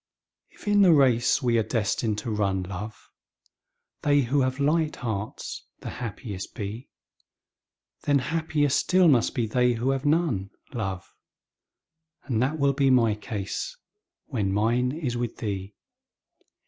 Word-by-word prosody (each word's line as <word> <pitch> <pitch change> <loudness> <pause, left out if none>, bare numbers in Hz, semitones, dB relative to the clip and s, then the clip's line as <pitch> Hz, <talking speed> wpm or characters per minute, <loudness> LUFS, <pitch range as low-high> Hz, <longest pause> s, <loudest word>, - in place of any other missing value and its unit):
If - - -17
in 205 0 +4
the 180 -4 +7
race 130 -2 +3
we 120 -2 +3
are - - +3
destined 110 -1 -1
to 115 - -2
run, 100 -3 0
love, 100 +4 -6 1.0
They 145 -1 +4
who 135 +3 +1
have 130 +1 0
light 155 +2 +2
hearts 110 -4 -5
the - - -5
happiest 105 -4 -6
be, 110 +2 -6 1.2
Then 145 -1 +4
happier 150 +1 0
still 180 +6 +3
must 125 -5 +3
be 120 -4 +1
they 125 +2 +2
who 120 +3 0
have 135 0 -1
none, 145 - +1 0.2
love. 95 -6 -4 1.1
And 120 -5 -1
that 140 +5 0
will 140 -1 +2
be 135 0 +2
my 120 -4 +4
case 105 - -5 0.5
when 105 -9 -1
mine 120 +5 +2
is 135 -5 -3
with 120 -1 -3
thee. 100 -2 -4
120 Hz, 140 wpm, -26 LUFS, 105-140 Hz, 1.2 s, the